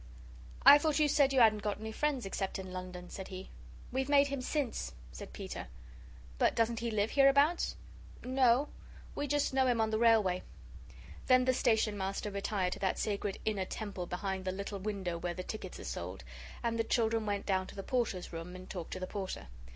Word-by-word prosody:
"I 290 - +11
thought 305 -1 +1
you 305 -1 +4
said 280 -1 +4
you 265 -2 +4
hadn't 215 -2 +5
got 210 0 -2
any 220 0 -5
friends 275 0 -1
except 195 0 -3
in 190 -1 -7
London," 180 -1 -7
said 190 - -6
he. 185 0 -8 0.4
"We've 265 +2 -1
made 285 -1 +5
him 275 -2 -3
since," 250 - -2 0.2
said - - -9
Peter. - - -6 0.7
"But - - +4
he - - -15
doesn't 230 0 +1
live 220 -2 0
hereabouts?" 280 +4 +4 0.5
"No 255 +1 +3 0.4
we 290 - -2
just 290 -1 +1
know 265 -1 +3
him 240 -2 +2
on 220 0 +2
the 220 - +1
railway." 220 -6 +4 0.9
Then 255 -1 +5
the 255 - +3
Station 220 -4 +2
Master 195 +2 -2
retired 195 -2 -1
to - - -8
that 190 -1 0
sacred 200 -1 -2
inner 205 -3 0
temple 195 -3 -5
behind 190 +1 -3
the 185 - -1
little 200 +1 -5
window 190 -4 -3
where 175 0 -3
the 185 - -5
tickets 215 - -6
are - - -8
sold, - - -5 0.4
and 230 -1 0
the - - +3
children 225 -1 +1
went 200 -1 -1
down 190 -2 0
to - - -11
the 195 - -5
Porters' 225 -9 -1
room 165 +2 -6
and 185 0 -10
talked 175 -3 -6
to - - -4
the 185 - -3
Porter. 185 - -5
215 Hz, 200 wpm, -33 LUFS, 190-255 Hz, 0.9 s, I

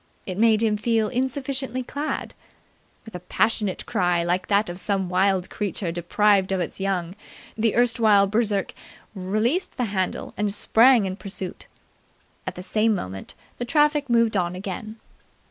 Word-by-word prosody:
It 185 0 -5
made 225 -1 +4
him 215 -2 +2
feel 220 0 +1
insufficiently 260 0 -2
clad. 290 +5 -4 0.7
With 225 - -12
a 180 - -5
passionate 210 +2 0
cry 175 -1 +1
like 180 +2 -1
that 205 +1 +2
of 175 +1 -5
some 195 -2 -1
wild 185 0 +1
creature 195 -3 -3
deprived 190 +3 +2
of 190 - 0
its 175 - -4
young, 185 -3 -2 0.4
the 225 -1 +1
erstwhile 230 -4 +4
Berserk 205 -1 0 0.4
released 215 - -1
the 250 - 0
handle 190 -2 -2
and 210 -1 0
sprang 230 +2 +5
in 190 0 -4
pursuit. 190 -3 -6 0.8
At - - -4
the 180 - -7
same 215 +3 +1
moment 95 - -6 0.2
the 245 - -2
traffic 295 0 +2
moved 230 -2 +3
on 180 -2 0
again. 205 +4 -6
210 Hz, 150 wpm, -24 LUFS, 185-230 Hz, 0.8 s, sprang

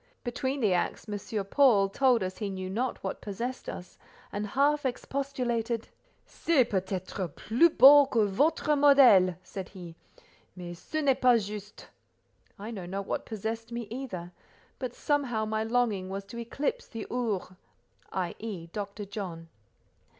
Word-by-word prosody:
Between 260 +3 -2
the 205 -5 +3
acts 175 - -1
M. 205 0 -4
Paul, 215 -3 +4
told 245 +1 +3
us 185 0 -5
he 210 -3 -2
knew 185 -1 -5
not 245 +5 -2
what - - -4
possessed 235 +6 -5
us, 180 - -9 0.3
and 210 +1 -3
half 290 +7 +2
expostulated. 245 -3 -2 0.4
"C'est 320 -6 +2
peut 190 -3 0
être 185 0 -3
plus 245 +10 +3
beau 285 -2 +8
que 230 -6 +2
votre 290 +9 +2
modèle," 260 - +6
said 190 -2 -7
he, 175 -4 -10 0.6
"mais 175 -1 -7
ce 310 - -4
n'est 270 -2 +2
pas 250 -2 +6
juste." 210 0 -9 0.7
I 210 +3 -7
know 190 -6 -6
not 195 +2 -4
what - - -3
possessed 225 +2 -4
me 235 0 -4
either; 205 -9 -6 0.5
but 250 -2 -4
somehow, 260 -7 0
my 215 0 -1
longing 220 -5 0
was 195 +1 -4
to 235 +4 -8
eclipse 295 - -3
the 225 - -6
"Ours," 230 -7 -1 0.6
i.e., 185 -1 -4
Dr. 205 0 -5
John. 185 -5 -7
220 Hz, 150 wpm, -29 LUFS, 195-255 Hz, 0.7 s, beau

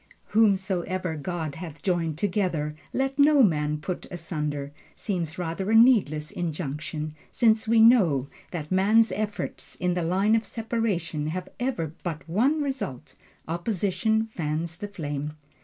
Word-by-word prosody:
"Whomsoever 190 -4 +1
God 155 0 -3
hath 160 -1 -9
joined 170 -5 0
together, 175 -5 0 0.2
let 270 +1 -1
no 285 -1 +7
man 150 -6 +2
put 175 +4 -5
asunder," 150 -4 -3 0.2
seems 170 -6 -3
rather 180 +3 -3
a 225 - +4
needless 200 - +5
injunction, 155 -2 -4 0.2
since 220 -1 +3
we 225 0 +5
know 180 - +5 0.2
that 155 -3 -6
man's 210 +3 +4
efforts 210 +2 -4
in 180 0 0
the 175 - -1
line 190 +6 +2
of 225 - +1
separation 215 -10 -2
have 180 +3 -4
ever 205 - -2
but 165 -2 -5
one 265 - +2
result: 265 - -4 0.3
opposition 195 +5 0
fans 165 -4 -3
the 205 - -5
flame. 150 -6 -4
180 Hz, 135 wpm, -26 LUFS, 155-220 Hz, 0.3 s, no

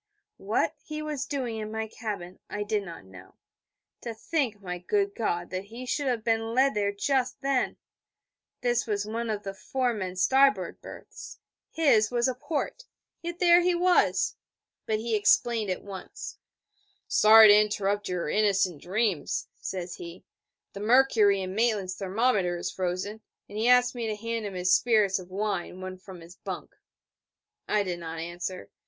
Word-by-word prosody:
What - - 0
he 305 0 -5
was 295 -3 -3
doing 255 -6 -3
in 215 0 -5
my 220 0 -3
cabin 200 -5 -6
I 205 0 -3
did 210 0 0
not 170 - -10
know. 95 -1 -14 0.7
To 235 -2 -5
think, 245 -3 -1
my 180 -3 -5
good 400 - 0
God, 175 - -2
that 185 +1 -4
he 235 +5 -9
should 280 +2 -1
have 240 -4 0
been 225 0 0
led 270 +2 +4
there 205 -1 0
just 255 +7 -1
then! 270 -2 0 0.8
This 240 -1 +1
was 205 -1 -1
one 230 +2 -3
of 210 -1 -2
the 195 - -5
four 250 +5 -1
men 185 -4 -4
starboard 270 +8 +3
berths: - - -10 0.3
his 230 -10 +3
was 240 0 +1
a 255 - 0
port: 295 - -4 0.4
yet 345 0 -5
there 350 -1 +6
he 355 0 +2
was! 355 +1 +2 0.5
But 220 - +1
he 225 +1 -1
explained 215 +1 +3
at 185 - -3
once. 195 -2 -8 0.7
'Sorry 220 0 +8
to 205 +1 +8
interrupt 205 -1 -1
your 180 -3 -2
innocent 195 -4 +1
dreams, 195 -2 -1
says 180 -2 -5
he: 170 +1 -10 0.5
'the 200 - -7
mercury 215 -4 +4
in 185 0 -5
Maitland's 210 -4 +1
thermometer 195 -2 0
is 175 - -3
frozen, 185 +4 -3 0.3
and 205 - -12
he 220 +2 0
asked 250 0 +5
me 235 -2 -3
to 215 - -2
hand 230 0 -3
him 195 - -7
his 180 0 +2
spirits 215 -5 +3
of 180 -1 -11
wine 195 -2 -3
one 185 0 -7
from 185 -2 -11
his 170 +2 -14
bunk...' - - -7 0.9
I 210 -1 +2
did 180 -3 -4
not 165 -1 -6
answer. 175 +2 -6
215 Hz, 170 wpm, -27 LUFS, 185-245 Hz, 0.9 s, Sorry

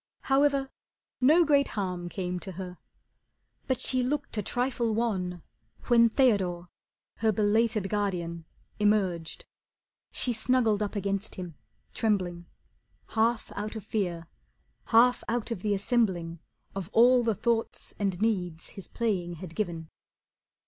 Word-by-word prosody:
However, 275 0 +2 0.5
no 310 +7 +5
great 285 -2 +4
harm 180 -3 -2
Came 180 -1 -3
to 190 +1 -8
her. 180 0 -7 0.9
But 260 -3 0
she 255 -1 +1
looked 280 +2 -2
a 210 - 0
trifle 240 0 -1
wan 185 -7 -1 0.5
When 235 -1 +6
Theodore, 190 -9 +1 0.5
her 220 +1 +2
belated 215 0 +2
guardian, 175 -5 -2 0.3
Emerged. 195 -6 +1 0.7
She 245 - -1
snuggled 225 -2 +2
up 210 +1 -2
against 200 +1 -2
him, 180 -3 -6 0.4
trembling, 180 -6 -1 0.6
Half 225 +1 +1
out 210 +2 -4
of 220 - -6
fear, 180 -6 -2 0.6
half 245 +2 +4
out 235 +1 -2
of 210 -6 -3
the 205 0 +1
assembling 190 -6 0 0.3
Of 195 -3 -5
all 245 +2 +6
the 225 -2 +1
thoughts 225 +2 -1
and 195 -3 -1
needs 180 -7 -1
his 195 -4 -10
playing 190 -7 -1
had 170 0 -9
given. 170 -5 -3
210 Hz, 130 wpm, -28 LUFS, 180-235 Hz, 0.9 s, When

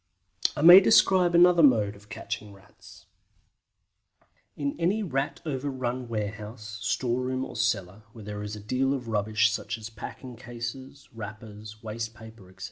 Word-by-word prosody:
I 150 - -2
may 175 +3 +11
describe 185 -4 +4
another 175 0 +6
mode 110 -8 +4
of 100 +1 -18
catching 110 -2 -6
Rats. 100 +1 -17 1.5
In 140 -1 -2
any 195 +6 +1
Rat 135 -6 -2
overrun 130 -3 -3
warehouse, 110 0 -6
storeroom, 130 +3 -1
or - - -10
cellar, 105 -4 -1
where 110 -2 -12
there 105 0 -6
is 105 +1 -5
a - - -8
deal 130 +6 0
of 125 -4 -7
rubbish 110 0 +2
such 115 +1 -4
as 110 0 -9
packing 120 +3 -9
cases, 120 +4 -8
wrappers, 110 -1 -10
waste 110 0 -5
paper, 110 -4 -14
etc. 95 - -21
115 Hz, 145 wpm, -27 LUFS, 105-135 Hz, 1.5 s, may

